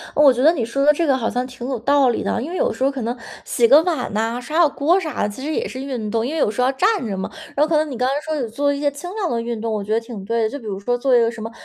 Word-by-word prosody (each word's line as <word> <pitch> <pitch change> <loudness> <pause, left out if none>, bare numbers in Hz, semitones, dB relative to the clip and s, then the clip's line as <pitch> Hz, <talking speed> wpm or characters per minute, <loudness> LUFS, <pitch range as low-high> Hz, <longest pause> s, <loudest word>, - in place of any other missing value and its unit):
我 290 -2 +7
觉 250 - -1
得 315 +5 +6
你 260 - -2
说 275 +5 -1
的 300 - +6
这 335 +3 0
个 275 -3 +3
好 230 -3 -1
像 250 +2 -2
挺 250 -1 -8
有 265 -2 -2
道 275 +3 +3
理 235 - -1
的。 - - -1
因 275 - -5
为 360 - -5
有 - - +1
时 - - -9
候 270 - +4
可 275 -2 -5
能 235 +2 -3 0.3
洗 235 - +2
个 285 +6 +7
碗 345 -3 -1
呐、 225 +3 -1
刷 305 +6 -4
下 340 - +7
锅 300 +6 +2
啥 315 -4 -3
的， - - +1
其 235 +6 -8
实 310 - -2
也 - - -1
是 260 - -7
运 250 -6 -4
动， 225 +1 0
因 265 - -3
为 320 - -2
有 - - +3
时 220 - -2
候 250 - +3
要 265 - +2
站 385 - +1
着 200 -4 -3
嘛。 190 - -3 0.2
然 285 - -1
后 - - -5
可 320 - +1
能 305 0 +1
你 255 - -5
刚 250 +2 +1
才 270 - +1
说 315 0 -4
有 240 - -2
做 285 +6 0
一 280 - -4
些 290 0 +2
轻 355 +6 -8
量 395 -5 -1
的 230 -1 -1
运 235 -1 -4
动， 225 0 -3
我 210 -2 -2
觉 215 - -2
得 225 - +3
挺 230 -3 -9
对 230 +3 0
的。 220 - +1
就 285 - -6
比 225 - -14
如 195 -2 -4
说 245 +5 -1
做 260 +1 +1
一 245 - +6
个 230 -1 +3
什 235 -1 -8
么， 225 - -6
255 Hz, 400 characters per minute, -21 LUFS, 230-290 Hz, 0.3 s, 我